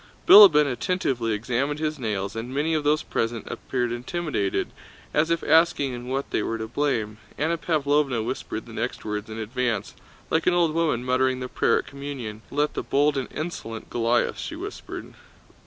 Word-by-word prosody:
Bilíbin 175 Hz, -8 st, +10 dB
attentively 130 Hz, -, -1 dB
examined 125 Hz, +7 st, -1 dB
his 155 Hz, -1 st, -2 dB
nails, 105 Hz, -4 st, -2 dB
and 115 Hz, +3 st, -5 dB
many 150 Hz, +4 st, 0 dB
of 155 Hz, -2 st, 0 dB
those 150 Hz, +1 st, +2 dB
present 115 Hz, 0 st, -2 dB
appeared 125 Hz, -2 st, -2 dB
intimidated, 125 Hz, -, -2 dB, 0.4 s
as 155 Hz, +2 st, +2 dB
if 165 Hz, 0 st, 0 dB
asking 160 Hz, -5 st, +3 dB
in 120 Hz, 0 st, -7 dB
what 135 Hz, +2 st, -3 dB
they -, -, +1 dB
were 115 Hz, -, -2 dB
to 110 Hz, 0 st, -5 dB
blame. 110 Hz, -5 st, -1 dB, 0.2 s
Anna 160 Hz, +3 st, +1 dB
Pávlovna 145 Hz, -6 st, +1 dB
whispered -, -, -4 dB
the -, -, -12 dB
next -, -, -4 dB
words 105 Hz, 0 st, -4 dB
in 110 Hz, -, -6 dB
advance, 115 Hz, -1 st, -2 dB, 0.4 s
like 160 Hz, -, +1 dB
an 180 Hz, -, +4 dB
old 170 Hz, -3 st, +3 dB
woman 155 Hz, -7 st, 0 dB
muttering 130 Hz, 0 st, +1 dB
the 125 Hz, -, -4 dB
prayer -, -, +2 dB
at -, -, -3 dB
Communion: 135 Hz, -6 st, -7 dB
"Let 145 Hz, +1 st, 0 dB
the -, -, -2 dB
bold 145 Hz, +1 st, +2 dB
and 135 Hz, -2 st, -3 dB
insolent 135 Hz, -9 st, -6 dB
Goliath..." 120 Hz, +1 st, +1 dB
she -, -, -5 dB
whispered. -, -, -7 dB
130 Hz, 175 wpm, -25 LUFS, 115-150 Hz, 0.4 s, Bilíbin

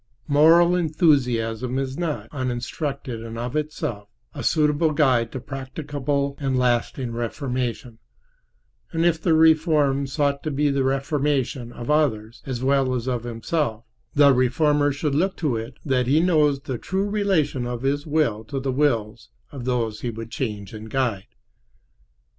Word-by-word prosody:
Moral 165 Hz, +4 st, +5 dB
enthusiasm 130 Hz, -, +1 dB
is 135 Hz, -1 st, -2 dB
not, 165 Hz, -2 st, -3 dB
uninstructed 130 Hz, -1 st, -4 dB
and 115 Hz, 0 st, -7 dB
of 120 Hz, +3 st, -4 dB
itself, 135 Hz, -9 st, -3 dB, 0.2 s
a -, -, -6 dB
suitable 155 Hz, 0 st, +2 dB
guide 130 Hz, -6 st, +2 dB
to 130 Hz, -, -5 dB
practicable 140 Hz, +1 st, -3 dB
and 135 Hz, -3 st, 0 dB
lasting 125 Hz, 0 st, 0 dB
reformation; 120 Hz, 0 st, -3 dB, 0.9 s
and 165 Hz, +1 st, 0 dB
if 165 Hz, -2 st, +2 dB
the 165 Hz, -2 st, +3 dB
reform 155 Hz, -4 st, +3 dB
sought 140 Hz, 0 st, 0 dB
be 145 Hz, 0 st, +2 dB
the 140 Hz, -1 st, +1 dB
reformation 135 Hz, -2 st, -1 dB
of 120 Hz, +3 st, -4 dB
others 115 Hz, -8 st, 0 dB
as 130 Hz, -2 st, -3 dB
well 135 Hz, -1 st, +2 dB
as 120 Hz, -1 st, -3 dB
of 120 Hz, -2 st, -2 dB
himself, 115 Hz, 0 st, -2 dB, 0.3 s
the 145 Hz, -1 st, +6 dB
reformer 145 Hz, +3 st, +2 dB
should 145 Hz, +1 st, -2 dB
look 185 Hz, +6 st, +1 dB
to 150 Hz, -8 st, 0 dB
it 115 Hz, +3 st, -6 dB
that 130 Hz, -3 st, +1 dB
he 145 Hz, +4 st, +4 dB
knows 150 Hz, -5 st, +3 dB
the 130 Hz, -3 st, -5 dB
true 195 Hz, +2 st, -1 dB
relation 185 Hz, -11 st, 0 dB
of 120 Hz, 0 st, -4 dB
his 145 Hz, +3 st, -1 dB
will 145 Hz, -8 st, +1 dB
to 135 Hz, +4 st, -4 dB
the 135 Hz, 0 st, -2 dB
wills 115 Hz, -5 st, 0 dB, 0.2 s
of 135 Hz, -5 st, -7 dB
those 115 Hz, -4 st, -1 dB
he 120 Hz, -, -2 dB
would 115 Hz, 0 st, -7 dB
change 105 Hz, -6 st, -4 dB
and 110 Hz, 0 st, -8 dB
guide. 115 Hz, -7 st, -1 dB
135 Hz, 150 wpm, -23 LUFS, 120-150 Hz, 0.9 s, the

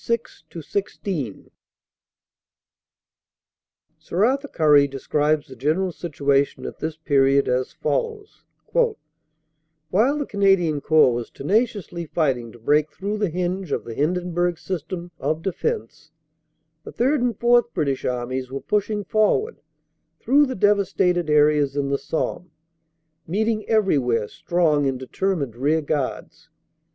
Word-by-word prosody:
6 235 Hz, 0 st, -3 dB
16 165 Hz, -, -4 dB, 2.5 s
SIR 190 Hz, +5 st, 0 dB
ARTHUR 275 Hz, +4 st, 0 dB
CURRIE 150 Hz, -, +4 dB
describes 150 Hz, +2 st, 0 dB
the 130 Hz, -, -11 dB
general 155 Hz, +9 st, 0 dB
situation 140 Hz, -4 st, 0 dB
at -, -, -7 dB
this 160 Hz, 0 st, -4 dB
period 140 Hz, -3 st, +3 dB
as 125 Hz, 0 st, 0 dB
follows: 445 Hz, -3 st, -3 dB, 0.3 s
"While 160 Hz, -, -2 dB
the 290 Hz, -, -2 dB
Canadian 195 Hz, -, +2 dB
Corps 155 Hz, -5 st, +4 dB
was 120 Hz, 0 st, -4 dB
tenaciously 195 Hz, -, -1 dB
fighting 130 Hz, -8 st, -1 dB
to 120 Hz, -, -14 dB
break 150 Hz, +6 st, +1 dB
through 205 Hz, +5 st, -4 dB
the 205 Hz, -3 st, +1 dB
hinge 180 Hz, 0 st, -3 dB
of -, -, -1 dB
the 115 Hz, -, -7 dB
Hindenburg 175 Hz, +4 st, 0 dB
System 175 Hz, 0 st, -5 dB
of 155 Hz, +1 st, -2 dB
defense, 145 Hz, -, -3 dB, 0.7 s
the -, -, -9 dB
Third 265 Hz, +3 st, +1 dB
and 240 Hz, -4 st, 0 dB
Fourth 240 Hz, 0 st, +4 dB
British 140 Hz, -6 st, -1 dB
Armies 125 Hz, +1 st, -3 dB
were 135 Hz, +1 st, -4 dB
pushing 210 Hz, 0 st, -1 dB
forward 215 Hz, -, +1 dB, 0.6 s
through 285 Hz, +3 st, +4 dB
the 260 Hz, -, -4 dB
devastated 190 Hz, -4 st, +2 dB
areas 150 Hz, -2 st, +3 dB
in 140 Hz, -1 st, -1 dB
the 140 Hz, -, 0 dB
Somme, 165 Hz, +4 st, -3 dB, 0.8 s
meeting 215 Hz, +5 st, -1 dB
everywhere 135 Hz, -, +2 dB
strong 155 Hz, -3 st, +1 dB
and 135 Hz, -1 st, -1 dB
determined 140 Hz, -, -2 dB
rearguards. 150 Hz, +3 st, -2 dB
160 Hz, 120 wpm, -23 LUFS, 140-200 Hz, 2.5 s, CURRIE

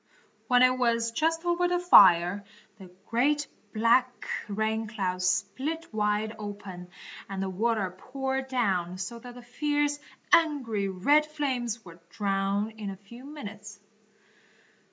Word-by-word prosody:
When 250 Hz, -1 st, +5 dB
it 255 Hz, 0 st, +4 dB
was 230 Hz, -1 st, +1 dB
just 325 Hz, +6 st, 0 dB
over 345 Hz, +1 st, +2 dB
the 355 Hz, 0 st, +1 dB
fire, 200 Hz, -, +6 dB, 0.4 s
the 190 Hz, -2 st, -12 dB, 0.2 s
great, 290 Hz, +6 st, +1 dB, 0.3 s
black, 240 Hz, +3 st, +2 dB, 0.2 s
rain 220 Hz, +1 st, -1 dB
cloud 190 Hz, -4 st, -3 dB
split 260 Hz, -, -1 dB
wide 210 Hz, +1 st, 0 dB
open, 200 Hz, -4 st, -8 dB, 0.4 s
and 195 Hz, -1 st, -5 dB
the 190 Hz, 0 st, -2 dB
water 215 Hz, -1 st, 0 dB
poured 265 Hz, +5 st, -3 dB
down 190 Hz, -9 st, 0 dB
so 190 Hz, +5 st, -5 dB
that 245 Hz, +1 st, -11 dB
the 245 Hz, -, -11 dB
fierce, 290 Hz, +3 st, -1 dB, 0.3 s
angry, 260 Hz, -11 st, +3 dB
red 285 Hz, +12 st, +3 dB
flames 255 Hz, -7 st, -3 dB
were 170 Hz, -1 st, -13 dB
drowned 200 Hz, +1 st, -1 dB
in 205 Hz, -2 st, -4 dB
a 195 Hz, -, -7 dB
few 235 Hz, +6 st, -14 dB
minutes. 210 Hz, -8 st, -9 dB
225 Hz, 135 wpm, -28 LUFS, 200-265 Hz, 0.4 s, fire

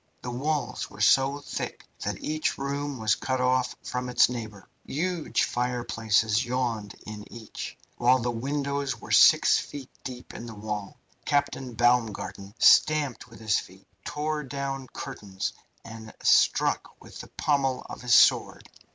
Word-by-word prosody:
The 125 Hz, -, -4 dB
walls 145 Hz, +5 st, -2 dB
were -, -, -14 dB
so 135 Hz, +2 st, +4 dB
thick -, -, -5 dB
that -, -, -3 dB
each 155 Hz, +1 st, -1 dB
room 140 Hz, 0 st, -3 dB
was 110 Hz, -2 st, +2 dB
cut 130 Hz, +6 st, -2 dB
off 125 Hz, 0 st, +1 dB
from 125 Hz, 0 st, -3 dB
its 125 Hz, -1 st, +5 dB
neighbour. 110 Hz, -5 st, -7 dB, 0.2 s
Huge 170 Hz, +2 st, -1 dB
fireplaces 115 Hz, -3 st, +1 dB
yawned 120 Hz, -4 st, -2 dB
in 105 Hz, -1 st, -9 dB
each, 115 Hz, -2 st, -8 dB, 0.2 s
while 125 Hz, +2 st, +5 dB
the 120 Hz, -1 st, -1 dB
windows 140 Hz, +2 st, -2 dB
were -, -, -10 dB
6ft. 140 Hz, -3 st, +5 dB, 0.2 s
deep 125 Hz, -1 st, -8 dB
in 115 Hz, -, -8 dB
the 115 Hz, -, -8 dB
wall. 105 Hz, -1 st, -5 dB, 0.3 s
Captain 140 Hz, -4 st, -1 dB
Baumgarten 115 Hz, -4 st, 0 dB
stamped 150 Hz, -3 st, +4 dB
with -, -, -14 dB
his 110 Hz, -1 st, +1 dB
feet, -, -, -13 dB, 0.2 s
tore 150 Hz, +1 st, -2 dB
down 135 Hz, -1 st, -4 dB
curtains, 105 Hz, -10 st, -5 dB, 0.3 s
and 110 Hz, -1 st, -9 dB
struck -, -, +3 dB
with -, -, -12 dB
the -, -, -11 dB
pommel 135 Hz, -3 st, +1 dB
of -, -, -8 dB
his 125 Hz, -1 st, +4 dB
sword. -, -, +4 dB
125 Hz, 145 wpm, -27 LUFS, 115-140 Hz, 0.3 s, its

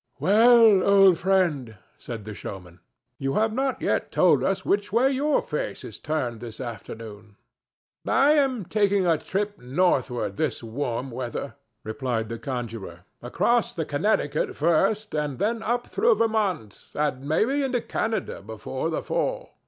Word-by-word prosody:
"Well, 225 Hz, 0 st, +6 dB
old 195 Hz, -3 st, +5 dB
friend," 170 Hz, -, +1 dB, 0.2 s
said 115 Hz, -4 st, -7 dB
the 105 Hz, -, -6 dB
showman, 90 Hz, -3 st, -9 dB, 0.4 s
"you 135 Hz, 0 st, -2 dB
have 215 Hz, 0 st, +1 dB
not 265 Hz, +2 st, -1 dB
yet -, -, 0 dB
told -, -, +4 dB
us -, -, -1 dB
which 205 Hz, 0 st, 0 dB
way 250 Hz, +5 st, +3 dB
your 285 Hz, +2 st, +1 dB
face 150 Hz, -9 st, -4 dB
is 110 Hz, -, -9 dB
turned 130 Hz, -7 st, -3 dB
this 115 Hz, -1 st, -9 dB
afternoon." 110 Hz, -3 st, -8 dB, 0.7 s
"I 280 Hz, +2 st, +4 dB
am 270 Hz, -, +2 dB
taking 200 Hz, 0 st, +1 dB
a 165 Hz, -3 st, +2 dB
trip 205 Hz, +2 st, -3 dB
northward 130 Hz, -2 st, 0 dB
this 150 Hz, -7 st, -2 dB
warm 125 Hz, +2 st, -3 dB
weather," 120 Hz, -1 st, -5 dB, 0.3 s
replied 115 Hz, -1 st, -3 dB
the 115 Hz, 0 st, -5 dB
conjurer, 115 Hz, -8 st, -6 dB, 0.2 s
"across 235 Hz, -, 0 dB
the 165 Hz, -3 st, -2 dB
Connecticut 150 Hz, -1 st, 0 dB
first, 195 Hz, +7 st, +1 dB
and 150 Hz, -3 st, -2 dB
then 225 Hz, -, -1 dB
up 240 Hz, +2 st, -1 dB
through 470 Hz, +1 st, +2 dB
Vermont, 200 Hz, -, -1 dB
and 145 Hz, -3 st, -1 dB
maybe 250 Hz, -, +2 dB
into 260 Hz, -3 st, 0 dB
Canada 220 Hz, -3 st, -3 dB
before 105 Hz, -1 st, -5 dB
the -, -, -3 dB
fall. -, -, -2 dB
155 Hz, 145 wpm, -25 LUFS, -, 0.7 s, Well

